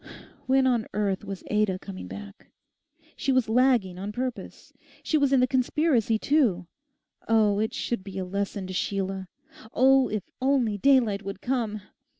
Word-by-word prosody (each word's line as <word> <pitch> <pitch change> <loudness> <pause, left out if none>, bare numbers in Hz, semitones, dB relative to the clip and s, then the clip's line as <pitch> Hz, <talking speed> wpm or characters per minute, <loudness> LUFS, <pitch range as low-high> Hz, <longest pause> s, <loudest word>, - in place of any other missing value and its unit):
When 265 0 +3
on 240 -4 +1
earth 200 -2 -1
was 195 -2 -7
Ada 210 -3 +1
coming 190 0 -9
back? 205 0 -10 0.7
She 275 - -1
was 255 -3 +2
lagging 225 -6 +2
on 200 +2 -4
purpose. 250 +2 -6 0.3
She - - -1
was 285 -3 +3
in 270 -2 +4
the - - +5
conspiracy 255 -3 +1
too. 225 - +1 0.6
Oh, 215 -3 +3
it 220 +1 0
should 235 -5 -3
be 195 -1 -8
a 190 - -2
lesson 200 +1 -3
to 185 - -6
Sheila! 190 0 -2 0.5
Oh, 265 +1 +5
if 210 -3 -3 0.2
only 255 -6 +1
daylight 235 -6 +3
would 195 -1 -6
come! 225 -5 -2
215 Hz, 160 wpm, -26 LUFS, 195-255 Hz, 0.7 s, the